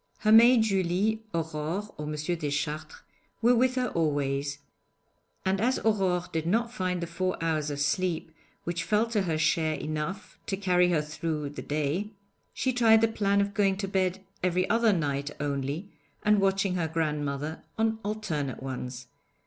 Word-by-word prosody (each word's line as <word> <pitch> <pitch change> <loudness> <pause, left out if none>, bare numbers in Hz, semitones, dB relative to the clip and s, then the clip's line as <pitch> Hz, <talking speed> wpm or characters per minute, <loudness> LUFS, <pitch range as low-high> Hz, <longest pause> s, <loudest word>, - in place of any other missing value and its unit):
Her 215 - +3
maid 230 +1 +8
Julie, 195 +2 +1
Aurore, 165 +5 -3
or 150 0 -6
M. 150 - -3
Deschartres 150 -1 -3 0.4
were 235 +2 +5
with 255 +1 +3
her 250 -1 0
always, 140 -3 0 0.9
and 190 +1 +1
as 255 +3 +2
Aurore 190 -5 +1
did 160 0 -1
not 230 +5 +1
find 185 -5 -1
the - - -1
four 185 +2 -2
hours 155 -2 0
of 145 -1 -4
sleep 160 +3 0 0.3
which 175 0 -2
fell 215 +1 +2
to 215 -3 +2
her 165 -4 -1
share 155 0 +2
enough 155 +7 -5
to 195 - -1
carry 180 -2 +3
her 160 -4 +2
through 150 -1 -3
the 150 - -7
day, 155 +7 -1 0.4
she 260 - -1
tried 225 -2 +5
the 225 - +5
plan 200 -2 +1
of 200 0 -1
going 195 -2 +2
to 195 0 -3
bed 190 -1 0 0.2
every 185 0 +1
other 230 -1 +4
night 145 -5 -1
only, 145 +6 -3 0.3
and 210 -1 +4
watching 195 -1 +2
her 170 -3 0
grandmother 150 -1 -2 0.2
on 220 0 +1
alternate 170 -12 -3
ones. 125 -1 -5
180 Hz, 165 wpm, -28 LUFS, 150-205 Hz, 0.9 s, maid